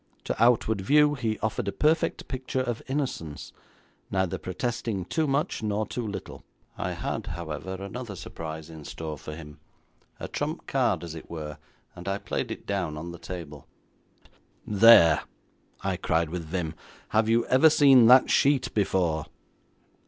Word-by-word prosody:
To - - 0
outward 110 -3 +3
view 150 +8 +4
he 115 -6 -2
offered 110 0 -1
a - - 0
perfect 155 +6 +1
picture 130 0 -2
of 120 -3 -3
innocence, 130 - -4 0.6
neither 95 -2 -1
protesting 100 0 -3
too 160 - 0
much 140 -2 0
nor 105 0 -1
too 115 +2 -4
little. 100 - -7 0.3
I - - -3
had, - - -4
however, 85 +2 -5
another 100 +3 -6
surprise 80 -3 -7
in 80 -2 -10
store 80 +1 -6
for 75 +1 -8
him, 75 -2 -11 0.6
a - - -5
trump - - -4
card, 80 - +1
as 85 -2 -6
it 80 - -10
were, 75 -2 -6 0.4
and 90 +1 -10
I 100 0 0
played - - -3
it - - -7
down 90 -7 -2
on 85 +3 -6
the 85 - -10
table. 80 -6 -8 1.0
'There!' 100 -7 +7 0.6
I 95 -2 -1
cried 80 -1 0
with 85 -2 -4
vim, 80 -1 -3 0.4
'have 110 0 +2
you 115 +1 +3
ever 130 +5 +6
seen 135 -6 +7
that 125 +2 +7
sheet 140 -2 +3
before?' 85 -6 0
95 Hz, 155 wpm, -27 LUFS, 80-120 Hz, 1.0 s, There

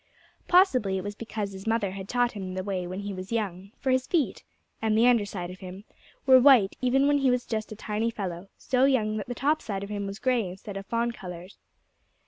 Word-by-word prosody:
Possibly 255 - +4
it 185 - -4
was 205 - -4
because 215 -2 -5
his 190 +2 -9
mother 225 -4 +1
had 190 0 -8
taught 245 -1 +2
him 190 -3 -6
the 185 - -3
way 185 -2 -3
when 185 +2 -5
he 200 0 -5
was 185 +2 -7
young; 195 -4 -3
for 265 - -1
his 255 0 +1
feet 285 - 0 0.4
and 220 -1 +2
the 230 - +5
under 235 -4 +4
side 180 -3 -5
of 185 - -11
him 185 +2 -9 0.4
were 260 -1 +8
white 250 -7 +6
even 260 +2 +3
when 290 0 +3
he 270 -1 +3
was 250 0 +1
just 220 -2 -3
a - - -5
tiny 215 +2 -2
fellow, 190 -4 -5
so 255 0 +2
young 220 -6 +2
that 210 - -5
the 245 - -4
top 300 +5 +1
side 195 -2 -4
of 200 - -7
him 200 -1 -3
was 195 0 -6
gray 245 -4 +1
instead 195 +2 -9
of 195 0 -6
fawn 235 +1 0
colored. 180 -4 -9
210 Hz, 235 wpm, -27 LUFS, 195-245 Hz, 0.4 s, were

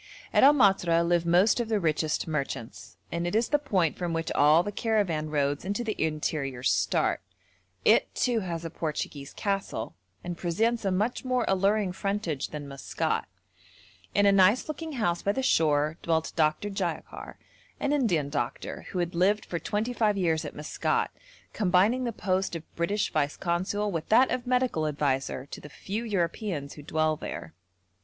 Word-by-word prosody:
At - - +5
El 285 +2 +8
Matra 175 -8 +3
live 170 -1 +2
most 180 +8 +4
of 235 -2 -2
the 215 -2 +2
richest 155 -2 0
merchants, 140 -7 -5
and 170 +1 -2
it 175 - -2
is 230 +1 +2
the 295 - +3
point 190 - 0
from 175 -2 -2
which 165 0 -2
all 150 +4 +5
the 205 - -4
caravan 200 -9 0
roads 145 -1 0
into 205 +5 -2
the 220 -2 -2
interior 150 -5 -2
start; - - +1 0.6
it, - - +4
too, 245 -3 +1
has 170 -4 -4
a 165 - -5
Portuguese 150 -3 -4
castle, 195 - -3 0.3
and 175 -1 -5
presents 220 +6 0
a 195 - +2
much 210 +6 0
more 255 -2 0
alluring 195 +1 +2
frontage 190 -6 -2
than 150 -2 -7
Maskat. 140 -1 -2 0.9
In 205 - +4
a 200 - +6
nice 195 +4 +4
looking 315 +1 -5
house 175 -9 0
by 200 - +1
the 265 - -2
shore 155 - +2
dwelt 160 -1 0
Dr. 155 +5 +1
Jayakar, 185 -4 -4 0.4
an 285 - 0
Indian 180 - +1
doctor, 120 -5 -4
who - - -5
had 175 -1 -1
lived 195 +5 +2
for 170 - -3
twenty 215 +6 -2
five 215 -4 +1
years 165 -4 +1
at - - -7
Maskat, 150 0 -1 0.4
combining 205 +6 +2
the 235 - -1
post 190 -4 -1
of 165 -1 -9
British 200 +5 -1
Vice 145 -1 0
Consul 190 +4 -1
with 165 -3 -4
that 250 +4 +5
of 250 0 -2
medical 250 -11 +1
adviser 135 -3 -1
to - - -9
the 150 - -10
few 205 +9 -5
Europeans 175 -7 -2
who 150 - -10
dwell 155 +1 0
there. 80 - -7
180 Hz, 175 wpm, -28 LUFS, 155-210 Hz, 0.9 s, El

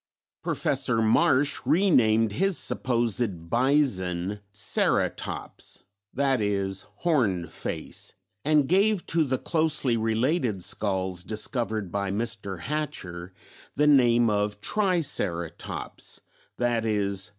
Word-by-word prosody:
Professor 115 - 0
Marsh 140 +5 +3
re 190 +3 +3
named 110 -4 +4
his 195 - +1
supposed 115 -8 -1
bison 105 -8 +1
"Ceratops" 105 -1 -1 0.4
(i.e. 105 -8 +1 0.3
"horned 115 - +1
face") - - -6 0.3
and 150 -2 +3
gave 195 +3 +3
to 165 -1 +2
the 130 -3 0
closely 155 -6 +1
related 115 - 0
skulls 95 -3 -1
discovered 110 -2 -2
by 100 0 -1
Mr. 100 -3 -3
Hatcher 90 - -4 0.4
the 150 - +3
name 120 -5 +5
of 105 -1 0
Triceratops 140 - -2 0.4
(_i.e. 110 -5 0
115 Hz, 95 wpm, -26 LUFS, 100-145 Hz, 0.4 s, name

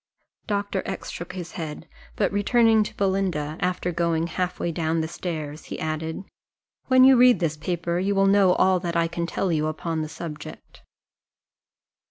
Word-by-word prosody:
Doctor 200 -2 -1
X - - -5
shook 175 - -7
his 175 -3 -7
head; 155 -3 -6 0.3
but - - +1
returning 220 +2 +4
to 210 - -3
Belinda, 190 -6 0
after 180 -1 -1
going 170 -1 0
half 180 +2 -3
way 170 - -1
down 160 -1 -1
stairs, 155 -3 -5
he - - -6
added, 160 +3 -3 0.6
"when 255 -1 +6
you 265 0 +8
read 250 0 +6
this 165 -3 0
paper, 170 +2 -2
you 200 +2 0
will 195 0 +4
know 195 -2 +5
all 185 0 +3
that 170 -1 -4
I 165 0 +2
can 170 0 -3
tell 185 +1 -1
you 155 -1 +1
upon 160 +1 -3
the 155 - -4
subject." 155 -2 -9
175 Hz, 170 wpm, -24 LUFS, 160-195 Hz, 0.6 s, you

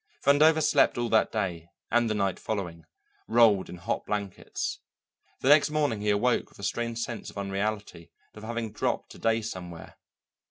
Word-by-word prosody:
Vandover 155 +3 +5
slept 140 - +3
all 120 -1 -1
that 110 -1 +3
day 90 -6 -3 0.2
and 120 -1 +3
the 110 - 0
night 100 -3 0
following, 85 -7 -4 0.4
rolled 110 -5 +4
in 90 - -8
hot 85 - -3
blankets. 100 -2 -3 0.6
The 130 - +2
next 150 +1 +6
morning 145 -8 0
he 105 - 0
awoke 115 +4 +1
with - - -20
a 100 - -11
strange 115 +3 -2
sense 115 0 -4
of - - -13
unreality 100 -3 -3 0.2
and 105 - -12
of - - -7
having 115 -2 -3
dropped 105 - -2
a - - -14
day 115 0 +1
somewhere. 90 -5 -8
110 Hz, 175 wpm, -28 LUFS, 100-120 Hz, 0.6 s, next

